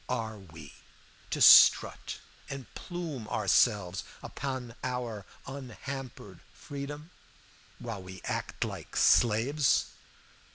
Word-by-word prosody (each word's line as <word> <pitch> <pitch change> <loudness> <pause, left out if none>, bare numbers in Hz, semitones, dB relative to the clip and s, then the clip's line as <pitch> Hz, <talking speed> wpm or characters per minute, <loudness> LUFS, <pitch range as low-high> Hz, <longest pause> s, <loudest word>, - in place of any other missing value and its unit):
Are 110 -4 -3
we 80 -6 -13 0.6
to - - -3
strut - - +7 0.3
and 135 -2 -6
plume 165 -10 -6
ourselves 95 -7 +2 0.2
upon 130 -4 -5
our 120 -6 -4 0.2
unhampered 130 -6 -8 0.2
freedom, 145 +3 -8 0.7
while 115 -5 -6
we 95 0 -11
act - - -3
like - - -7
slaves? 125 +6 +3
125 Hz, 90 wpm, -30 LUFS, 105-135 Hz, 0.7 s, strut